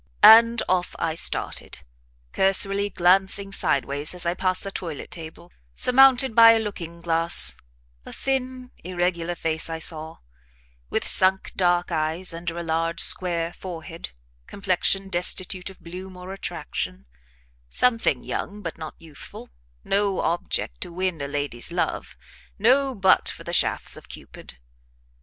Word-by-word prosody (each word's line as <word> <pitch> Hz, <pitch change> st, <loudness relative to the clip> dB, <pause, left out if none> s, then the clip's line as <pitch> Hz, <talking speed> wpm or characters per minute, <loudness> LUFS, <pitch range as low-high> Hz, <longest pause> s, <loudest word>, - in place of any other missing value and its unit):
And 230 Hz, +1 st, +7 dB
off 180 Hz, -1 st, -1 dB
I 165 Hz, -1 st, -2 dB
started, 165 Hz, -, -1 dB, 0.5 s
cursorily 195 Hz, +1 st, +2 dB
glancing 190 Hz, +2 st, +1 dB
sideways 145 Hz, -2 st, -1 dB
as 180 Hz, -, 0 dB
I 170 Hz, -, 0 dB
passed 185 Hz, 0 st, -1 dB
the 195 Hz, -, -6 dB
toilet 165 Hz, -7 st, -7 dB
table, 165 Hz, +1 st, -10 dB, 0.2 s
surmounted 265 Hz, -, +5 dB
by 230 Hz, 0 st, +8 dB
a 225 Hz, -, +1 dB
looking 170 Hz, -6 st, -7 dB
glass: 165 Hz, 0 st, +3 dB, 0.5 s
a -, -, -11 dB
thin 255 Hz, -1 st, -4 dB
irregular 175 Hz, -1 st, -2 dB
face 160 Hz, -1 st, -1 dB
I 165 Hz, -, -4 dB
saw, 160 Hz, -1 st, -2 dB, 0.7 s
with -, -, -2 dB
sunk, 190 Hz, +1 st, +4 dB
dark 175 Hz, -1 st, +1 dB
eyes 165 Hz, +3 st, -1 dB
under 170 Hz, 0 st, -5 dB
a 170 Hz, -, -4 dB
large, 165 Hz, 0 st, -2 dB
square 170 Hz, -2 st, +3 dB
forehead, 170 Hz, -2 st, -9 dB, 0.4 s
complexion 195 Hz, 0 st, -1 dB
destitute 180 Hz, 0 st, -2 dB
of 190 Hz, -, -15 dB
bloom 185 Hz, +2 st, -10 dB
or 180 Hz, +1 st, -9 dB
attraction; 60 Hz, -, -6 dB, 0.6 s
something 235 Hz, -, +1 dB
young, 205 Hz, +1 st, -6 dB
but 165 Hz, -, -6 dB
not 155 Hz, -1 st, -8 dB
youthful, 155 Hz, -, -12 dB, 0.3 s
no 200 Hz, -1 st, 0 dB
object 160 Hz, -, -3 dB
to -, -, -6 dB
win 180 Hz, -3 st, -3 dB
a 140 Hz, -, -4 dB
lady's 145 Hz, -2 st, -4 dB
love, 175 Hz, -, -3 dB, 0.4 s
no 260 Hz, +5 st, +2 dB
butt 190 Hz, -2 st, +3 dB
for -, -, -9 dB
the -, -, -7 dB
shafts -, -, +1 dB
of -, -, -13 dB
Cupid. -, -, -11 dB
180 Hz, 140 wpm, -23 LUFS, 165-195 Hz, 0.7 s, by